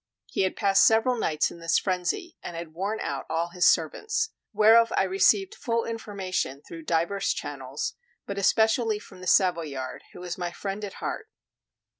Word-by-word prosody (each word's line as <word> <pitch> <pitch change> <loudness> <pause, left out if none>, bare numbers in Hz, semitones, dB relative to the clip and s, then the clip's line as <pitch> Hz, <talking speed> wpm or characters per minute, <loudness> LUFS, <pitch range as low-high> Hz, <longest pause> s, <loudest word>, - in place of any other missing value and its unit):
He - - -2
had 190 - +1
passed 195 -2 +4
several 225 +3 +3
nights 155 -9 0
in 170 - -11
this 165 0 +2
frenzy, 185 - -2
and 175 - -7
had 165 -1 -7
worn 200 +6 -2
out - - -4
all 165 +2 -1
his 180 +1 +2
servants; 435 - +1 0.2
whereof 225 +2 +6
I - - +4
received 195 +1 +3
full 230 -1 -1
information 190 - -3
through 165 -1 -9
divers 170 +5 +1
channels, 445 0 -4 0.3
but 200 0 -4
especially 220 +2 +3
from 190 -3 -13
the 185 - -7
Savoyard, 165 -9 +1
who - - -11
was 180 0 -5
my 175 -1 -2
friend 195 +3 -5
at 200 - -5
heart. 435 - -5
195 Hz, 170 wpm, -26 LUFS, 170-220 Hz, 0.3 s, whereof